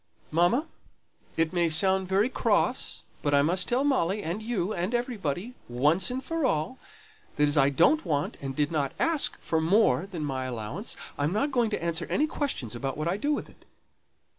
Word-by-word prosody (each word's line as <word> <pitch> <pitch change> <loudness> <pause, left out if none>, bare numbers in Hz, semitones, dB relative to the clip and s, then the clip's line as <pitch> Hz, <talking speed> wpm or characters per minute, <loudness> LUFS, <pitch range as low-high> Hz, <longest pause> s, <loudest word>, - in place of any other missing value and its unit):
"Mamma! 175 - +3 0.7
it 165 +1 +1
may 170 -2 +2
sound 190 +4 +3
very 195 +4 +3
cross, 260 - 0 0.2
but 145 -1 +2
I 140 - +5
must 180 +4 +1
tell 250 +3 +1
Molly, 210 -8 +1
and 175 +7 -3
you, 215 -3 -1
and 185 +7 -1
everybody, 230 - -2 0.2
once 150 - +2
for 330 +2 -2
all, 160 - 0 0.6
that 150 0 +3
as 145 - +1
I 140 -2 +5
don't 175 - +4
want 150 -4 -1
and 135 -1 -4
didn't 145 -2 0
ask 330 -3 0
for 160 -1 0
more 175 - +3
than 170 -6 -4
my 130 -2 -2
allowance, 125 - -5 0.2
I'm 145 +3 +1
not 255 +8 0
going 240 -4 +2
to 210 - -3
answer 165 0 -1
any 300 - +2
questions 280 - -3
about 135 +3 -4
what 155 +1 -2
I 175 - +1
do 285 +9 -1
with 295 - -1
it." - - -20
175 Hz, 185 wpm, -28 LUFS, 150-225 Hz, 0.7 s, I